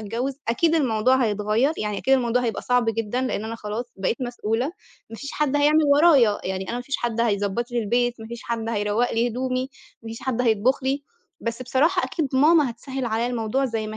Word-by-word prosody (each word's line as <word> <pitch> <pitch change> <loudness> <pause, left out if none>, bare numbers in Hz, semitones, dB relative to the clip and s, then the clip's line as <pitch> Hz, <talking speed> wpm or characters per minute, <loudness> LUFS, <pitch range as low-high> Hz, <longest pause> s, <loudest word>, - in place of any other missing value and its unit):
أتجوّز 235 +6 -3
أكيد 325 +8 +2
الموضوع 255 -4 +3
هيتغيّر، 215 +6 +1
يعني 210 -1 -2
أكيد 270 - +3
الموضوع 250 -1 +1
هيبقى 230 -2 -2
صعب 250 -1 +2
جدًا 225 +2 -1
لإن 255 -5 -2
أنا 225 +1 -4
خلاص 215 +1 -4
بقيت 195 +4 -1
مسؤولة 240 0 -1 0.4
ما 225 - -8
فيش 280 +4 -7
حد 290 -1 0
هيعمل 300 +2 +4
ورايا، 280 -10 +5
يعني 190 0 -3
أنا 235 - -2
ما 245 - -4
فيش 275 +2 -2
حد 230 -1 -2
هيضبّط 210 +1 0
لي 240 - -1
البيت، 240 +2 0
ما 220 - -8
فيش 235 +1 -8
حد 230 -1 -3
هيروّق 210 +2 0
لي 230 +1 +1
هدومي، 255 +2 -2 0.3
ما 225 - -8
فيش 225 0 -7
حد 255 -3 -1
هيطبُخ 235 +4 +2
لي، 270 +2 -1 0.4
بس 230 +2 -4
بصراحة 315 +9 +2
أكيد 315 -5 -2
ماما 295 +1 +4
هتسهّل 260 +3 -6
عليّا 230 0 0
الموضوع 245 +2 -1
زي 225 -4 -2
ما 215 - -6
240 Hz, 205 wpm, -23 LUFS, 220-260 Hz, 0.4 s, ورايا